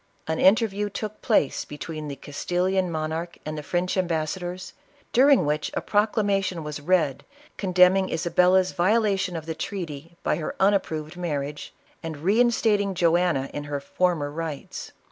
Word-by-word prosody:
An 160 Hz, 0 st, -1 dB
interview 205 Hz, 0 st, +3 dB
took 215 Hz, +1 st, -6 dB
place 215 Hz, -, +2 dB
between 155 Hz, +1 st, -7 dB
the 140 Hz, -, -5 dB
Castillian 180 Hz, +6 st, -1 dB
mon 155 Hz, -1 st, -2 dB
arch 170 Hz, +2 st, -4 dB
and 155 Hz, 0 st, -4 dB
the 150 Hz, -, -4 dB
French 175 Hz, +4 st, -1 dB
ambassadors, 180 Hz, +1 st, -2 dB, 0.4 s
during 270 Hz, -, +5 dB
which 150 Hz, +1 st, -1 dB
a -, -, 0 dB
proclamation 200 Hz, -4 st, +1 dB
was 150 Hz, -1 st, -6 dB
read, 155 Hz, -4 st, +1 dB, 0.3 s
condemning 185 Hz, 0 st, +4 dB
Isabella's 180 Hz, +3 st, +3 dB
violation 195 Hz, -1 st, +1 dB
of 160 Hz, -2 st, -5 dB
the 160 Hz, -, -3 dB
treaty 165 Hz, -3 st, -6 dB
by -, -, 0 dB
hefun 190 Hz, +5 st, +1 dB
approved 160 Hz, -4 st, -2 dB
marriage, 150 Hz, -4 st, -4 dB, 0.3 s
and 165 Hz, -1 st, -5 dB
reinstat 220 Hz, +4 st, +3 dB
ing 200 Hz, -2 st, -2 dB
Joanna 170 Hz, -5 st, +2 dB
in 145 Hz, -, -5 dB
her 145 Hz, -1 st, -3 dB
former 150 Hz, 0 st, 0 dB
rights. 155 Hz, -2 st, -6 dB
175 Hz, 145 wpm, -25 LUFS, 155-195 Hz, 0.4 s, during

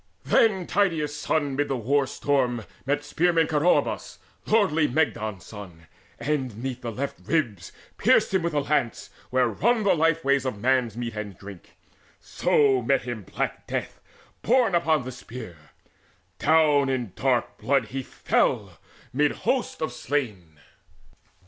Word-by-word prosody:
Then 195 Hz, -6 st, +3 dB
Tydeus' 165 Hz, -7 st, 0 dB
son 150 Hz, 0 st, 0 dB
amid 145 Hz, +2 st, -1 dB
the 135 Hz, -, -1 dB
war 135 Hz, +4 st, +1 dB
storm 125 Hz, -6 st, 0 dB, 0.2 s
met 145 Hz, +1 st, 0 dB
Spearman 170 Hz, -1 st, +2 dB
Coroebus, 155 Hz, +3 st, +1 dB, 0.3 s
lordly 165 Hz, -9 st, +3 dB
Mygdon's 110 Hz, -, -1 dB
son, 90 Hz, -6 st, -11 dB, 0.3 s
And 135 Hz, -7 st, -2 dB
'neath 130 Hz, -1 st, -4 dB
the 120 Hz, -, -4 dB
left 135 Hz, +5 st, -4 dB
ribs 115 Hz, -, -1 dB, 0.3 s
pierced -, -, +3 dB
him 190 Hz, -, +3 dB
with 170 Hz, -1 st, -2 dB
the 145 Hz, -, +2 dB
lance 140 Hz, -5 st, -1 dB, 0.2 s
Where 130 Hz, -1 st, +2 dB
run 220 Hz, -, +1 dB
the 200 Hz, -, +4 dB
life 165 Hz, -1 st, +1 dB
ways 140 Hz, -1 st, +3 dB
of 130 Hz, -5 st, -3 dB
man's 125 Hz, -2 st, +1 dB
meat 120 Hz, -2 st, -4 dB
and 105 Hz, -3 st, -6 dB
drink; 100 Hz, -3 st, -12 dB, 0.4 s
So 135 Hz, -3 st, +2 dB
met 135 Hz, +2 st, +1 dB
him 120 Hz, -3 st, -5 dB
black 95 Hz, -, -4 dB
death -, -, -4 dB, 0.4 s
borne 245 Hz, -3 st, +3 dB
upon 160 Hz, -4 st, +2 dB
the 130 Hz, -, -6 dB
spear: 120 Hz, -7 st, -9 dB, 0.8 s
Down 150 Hz, -3 st, +4 dB
in 125 Hz, -8 st, -2 dB
dark 130 Hz, -3 st, 0 dB
blood 135 Hz, -4 st, +1 dB
he 135 Hz, +1 st, -3 dB
fell -, -, -1 dB, 0.3 s
mid 145 Hz, +2 st, +2 dB
hosts 255 Hz, -10 st, -1 dB
of 155 Hz, -, -3 dB
slain. 105 Hz, -, -3 dB
135 Hz, 145 wpm, -25 LUFS, 120-155 Hz, 0.8 s, the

